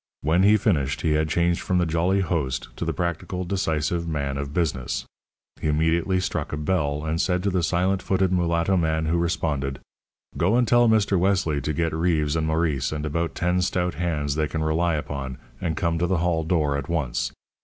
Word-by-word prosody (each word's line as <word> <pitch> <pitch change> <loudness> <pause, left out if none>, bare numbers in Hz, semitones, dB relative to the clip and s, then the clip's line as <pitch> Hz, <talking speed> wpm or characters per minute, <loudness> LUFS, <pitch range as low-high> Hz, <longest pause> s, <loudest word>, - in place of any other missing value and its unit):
When 80 +5 +3
he 105 +2 +6
finished, 75 - 0
he 80 - +1
had 75 +1 +1
changed 85 +2 +1
from 90 - 0
the 90 - +2
jolly 85 +4 +1
host 75 -8 -2
to - - -3
the - - 0
practical, 90 +1 -3
decisive 85 -2 -1
man 70 -4 -2
of 70 0 -4
business. 70 -7 -1 0.6
He - - -1
immediately 80 +4 +2
struck 85 -4 -2
a 75 - -2
bell, 75 -2 -1
and 80 +1 0
said 90 -1 0
to 100 - +1
the 90 -1 +1
silent 90 +3 +1
footed 95 0 +1
mulatto 85 +1 +1
man 80 -1 +1
who 85 +2 +1
responded: 75 -6 -1 0.6
"Go 95 +7 +2
and 125 -1 +3
tell 120 +1 +5
Mr. 105 -4 +3
Wesley 90 -6 +1
to 75 - -2
get 80 +1 -1
Reeves 80 -2 +1
and 80 -1 0
Maurice 80 -3 0
and 75 0 -3
about 85 +3 -2
ten 90 +1 +1
stout 90 -1 0
hands 75 -5 -1
they 75 +1 0
can 80 +3 -3
rely 80 +2 +1
upon, 70 -3 -4 0.2
and 80 -3 -2
come 85 -1 0
to 90 - +1
the 95 - +1
hall 85 -1 +1
door 75 -4 +1
at 70 - -7
once. 75 -8 -1
85 Hz, 200 wpm, -24 LUFS, 75-90 Hz, 0.6 s, he